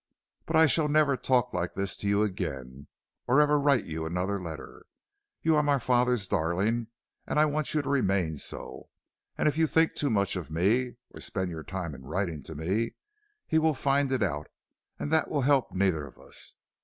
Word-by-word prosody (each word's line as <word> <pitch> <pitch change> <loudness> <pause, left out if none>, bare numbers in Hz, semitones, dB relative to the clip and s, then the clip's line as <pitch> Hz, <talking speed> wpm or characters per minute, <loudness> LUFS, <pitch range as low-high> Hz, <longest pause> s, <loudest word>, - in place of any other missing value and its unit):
But - - -1
I 160 0 +7
shall 155 +1 +3
never 150 -2 +3
talk 125 -1 +1
like 90 -1 -2
this 100 0 -1
to 100 - -4
you 100 +1 +3
again 70 -10 -4 0.4
or 130 +4 +4
ever 150 0 +4
write 140 -5 +3
you 80 0 -4
another 90 +4 -2
letter. 80 -4 -9 0.6
You 160 -1 +4
are 150 - +4
my 145 -1 +2
father's 125 -4 +2
darling, 100 +6 0 0.4
and - - -1
I 155 - +6
want 155 0 -1
you 150 - +2
to - - -7
remain 95 - +1
so, - - -6 0.5
and - - +2
if 150 +1 +1
you 160 - +4
think 160 +1 +3
too 145 - -1
much 100 -4 +1
of 90 -4 -5
me, 110 +10 +1 0.2
or - - -11
spend 95 -2 -3
your 80 -1 -6
time 90 -3 -5
in 65 - -10
writing 80 +2 -3
to 80 - -7
me, 95 +10 -1 0.5
he 160 - +2
will 160 -1 +2
find 140 0 +1
it 130 -4 +1
out, 75 -5 -2 0.5
and 145 - -4
that 160 - +3
will 145 - 0
help 135 0 +3
neither 90 -6 0
of 65 - -16
us. - - -8
105 Hz, 200 wpm, -28 LUFS, 90-140 Hz, 0.6 s, I